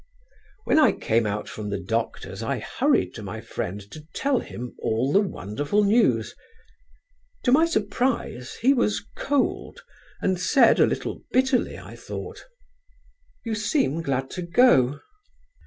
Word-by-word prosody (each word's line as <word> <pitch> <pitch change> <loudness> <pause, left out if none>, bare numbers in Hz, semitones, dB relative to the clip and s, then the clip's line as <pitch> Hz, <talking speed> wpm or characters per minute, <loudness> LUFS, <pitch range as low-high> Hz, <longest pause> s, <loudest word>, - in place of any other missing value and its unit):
"When - - +3
I 300 - +5
came 115 0 0
out 105 +1 -3
from 105 -1 -6
the 100 - -2
doctor's 115 +6 -3
I - - -1
hurried - - 0
to - - -8
my - - -6
friend 95 +3 -5
to 155 - -10
tell 275 -2 +1
him 125 +1 -7
all 120 +5 0
the 195 - +6
wonderful 145 - -1
news. 200 - +2 1.1
To 245 - +2
my 315 +5 +5
surprise 215 - -1
he 270 +3 +6
was 210 -5 0
cold 285 -1 -1 0.4
and 185 -2 0
said, 270 +8 +5
a - - +6
little - - -3
bitterly, 260 0 +1
I - - -11
thought: - - -8 1.0
"'You 225 - -2
seem 215 - 0
glad 135 -3 -2
to 180 - -5
go?' 170 - +4
180 Hz, 140 wpm, -25 LUFS, -, 1.1 s, the